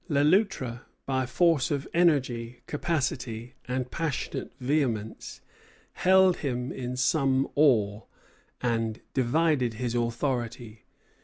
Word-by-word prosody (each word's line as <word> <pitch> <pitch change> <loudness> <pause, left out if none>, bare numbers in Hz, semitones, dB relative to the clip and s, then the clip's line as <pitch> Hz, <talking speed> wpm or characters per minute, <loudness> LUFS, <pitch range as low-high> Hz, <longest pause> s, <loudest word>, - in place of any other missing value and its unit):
Le 145 -2 +3
Loutre, 150 - +1 0.2
by 130 -1 0
force 165 +1 +2
of 140 -2 -2
energy, 125 -8 +1
capacity, 130 -6 -2
and 125 0 -2
passionate 160 -5 -3
vehemence, 125 -6 -2 0.5
held 190 -1 +4
him 125 -3 -3
in 125 -1 -5
some 135 0 +2
awe, 110 -8 +3 0.6
and 115 -2 -1
divided 130 -2 +1
his 120 +1 -2
authority. 120 -2 -2
130 Hz, 100 wpm, -27 LUFS, 120-150 Hz, 0.6 s, held